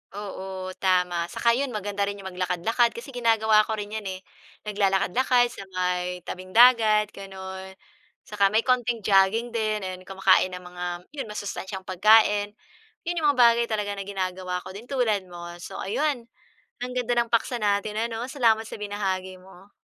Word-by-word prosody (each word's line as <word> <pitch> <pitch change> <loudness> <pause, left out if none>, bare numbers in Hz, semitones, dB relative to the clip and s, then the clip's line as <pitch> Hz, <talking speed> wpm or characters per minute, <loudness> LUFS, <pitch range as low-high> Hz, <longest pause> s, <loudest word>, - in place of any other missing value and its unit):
Oo, 190 -2 -6
tama. 180 -2 +1
Saka 235 +6 +1
'yon, 270 +4 0
maganda 205 -1 -2
rin 200 - -3
yung 190 -1 -8
maglakad-lakad 185 +6 0
kasi 240 +4 -8
ginagawa 220 -3 +3
ko 220 - -1
rin 210 -1 -6
'yan, 215 -2 -4
eh. 185 0 -5 0.4
Naglalakad-lakad 210 +5 +2
sa - - -9
may 180 -1 -1
tabing-dagat, 215 +2 +4
gano'n. 190 -1 -9 0.5
Saka 205 -2 +2
may 215 +3 +2
konting 245 -3 +1
jogging 200 +5 +3
din. 215 -2 -1
Ayun, 185 -1 -7
kumakain 190 -1 +3
ng 180 - -9
mga, 180 0 -8 0.3
'yon 280 -6 -5
masustansiyang 200 -2 -5
pagkain. 205 +2 +4 0.5
Yun 350 +1 -2
'yong 305 - +2
mga - - -5
bagay 235 -1 +6
talaga 205 -2 -2
na - - -3
ginagawa 185 -2 -3
ko - - -9
din, 210 +6 -10
tulad 225 -8 0
mo. 175 -1 -10 0.2
So - - -9
ayun, 270 +4 -1 0.6
ang 250 - -5
ganda 245 -1 -1
ng 235 -1 +1
paksa 235 +2 +1
natin 210 -1 0
ano. 230 +2 -2
Salamat 225 -5 +2
sa - - -7
binahagi 190 -3 -3
mo. 190 +1 -17
205 Hz, 165 wpm, -25 LUFS, 190-230 Hz, 0.6 s, bagay